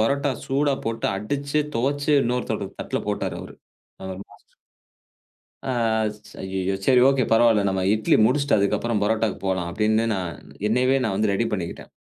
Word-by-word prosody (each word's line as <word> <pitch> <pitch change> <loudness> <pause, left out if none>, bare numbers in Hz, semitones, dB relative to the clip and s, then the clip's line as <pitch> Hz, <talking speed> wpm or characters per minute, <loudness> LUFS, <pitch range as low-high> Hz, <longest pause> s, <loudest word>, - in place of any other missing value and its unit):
பரோட்டா 140 +5 +1
சூடா 140 +1 +1
போட்டு 115 0 -1
அடிச்சு 140 +8 -1 0.2
துவச்சு 140 +4 0
இன்னொரு 125 +1 -1 0.3
தட்டுல - - -2
போட்டாரு - - -2
அவரு. - - -11 0.5
அவரு 95 -1 -6
மாஸ்டர் - - -22 1.1
ஆ - - -2 0.4
ச் 105 0 -18
அய்யய்யோ! 95 0 -2
சரி 130 -2 +5
ஓகே, 135 -2 +2
பரவால்ல, 115 -2 +5
நம்ம 95 -1 -1
இட்லி 110 0 +3
முடிச்சிட்டு 140 +5 +2
அதுக்கப்புறம் 105 +3 +1
பரோட்டாக்கு 110 0 0
போலாம் 95 -2 -1
அப்பிடின்னு 110 +4 +1
நான் 90 -3 -3 0.3
என்னயவே 125 +4 +3
நான் 110 - 0
வந்து 105 0 +1
ரெடி 100 +4 +1
பண்ணிக்கிட்டேன். 90 -5 -5
110 Hz, 150 wpm, -23 LUFS, 100-135 Hz, 1.1 s, சரி